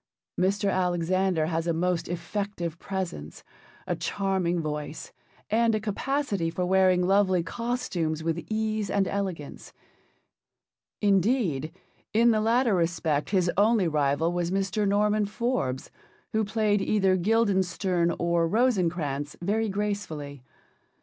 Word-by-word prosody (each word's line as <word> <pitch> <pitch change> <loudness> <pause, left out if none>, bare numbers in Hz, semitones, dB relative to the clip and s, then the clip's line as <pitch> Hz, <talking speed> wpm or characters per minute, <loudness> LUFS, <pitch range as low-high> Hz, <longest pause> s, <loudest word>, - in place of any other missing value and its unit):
Mr. 195 +2 +1
Alexander 180 -1 +1
has 165 +1 -2
a 170 - +2
most 175 +1 0
effective 175 -1 -4
presence, 180 - -5 0.4
a - - -1
charming 190 -3 -1
voice, 150 -1 -5 0.4
and 225 0 +3
a - - 0
capacity 215 - -1
for 180 +2 -2
wearing 185 -1 +3
lovely 190 -2 +3
costumes 185 -9 -2
with 165 +1 -2
ease 215 -1 -1
and 195 -2 +1
elegance. 185 -7 -4 1.3
Indeed, 195 - +2 0.4
in 235 +1 +5
the 215 -1 +2
latter 230 +1 +3
respect 165 -4 0
his 185 -3 +2
only 210 -2 +4
rival 150 +2 +1
was 175 -1 -1
Mr. 195 +2 0
Norman 210 +1 +2
Forbes, 210 - -2 0.4
who 220 0 +2
played 210 -1 +1
either 195 -2 +2
Guildenstern 185 -3 +1
or 170 -1 +1
Rosencrantz 170 - 0
very 215 +5 0
gracefully. 195 -9 -4
190 Hz, 115 wpm, -27 LUFS, 170-210 Hz, 1.3 s, in